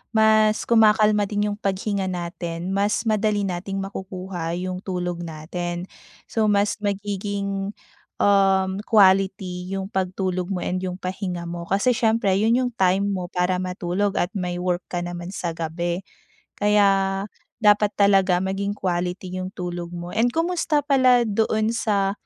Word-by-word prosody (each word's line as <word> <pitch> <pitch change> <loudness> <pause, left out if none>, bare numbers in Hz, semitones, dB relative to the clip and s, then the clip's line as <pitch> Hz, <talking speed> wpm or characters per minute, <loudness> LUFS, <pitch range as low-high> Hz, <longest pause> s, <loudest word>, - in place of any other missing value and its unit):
mas 215 -1 +4
kumakalma 215 -2 +4
din 205 0 -1
yung 205 - -6
paghinga 195 0 -1
natin, 175 0 -4
mas 205 +3 +1
madali 215 -2 +1
nating 195 +1 -3
makukuha 185 -3 -5
yung 180 +1 -3
tulog 180 -2 -3
natin. 175 +2 -5 0.5
So 220 -1 +1
mas 205 0 +2
magiging, 200 0 -3 0.5
um, 195 -1 +3
quality 190 -3 +3
yung 195 +1 -4
pagtulog 185 -1 -1
mo 185 -2 -3
and 185 - -1
yung 185 -1 -4
pahinga 185 -1 -4
mo 170 0 -6
kasi 200 +6 +2
siyempre 225 -3 +2
'yun 225 +3 +3
yung 250 - -1
time 190 +1 +3
mo 185 -2 -3
para 180 +1 0
matulog 185 +2 -1
at 175 - 0
may 180 -4 -3
work 180 0 -2
ka 175 -1 -3
naman 175 +2 -6
sa 170 - -2
gabi. 170 +2 -3 0.5
Kaya, 195 -2 +2 0.4
dapat 210 0 +4
talaga 195 -3 +4
maging 200 +1 -2
quality 180 0 -3
'yung 185 - -3
tulog 175 -1 -4
mo. 175 0 -6
And 225 +3 +2
kumusta 325 +1 0
pala 255 -4 +4
doon 220 0 +1
sa, 200 -4 +1
195 Hz, 145 wpm, -23 LUFS, 180-205 Hz, 0.5 s, mas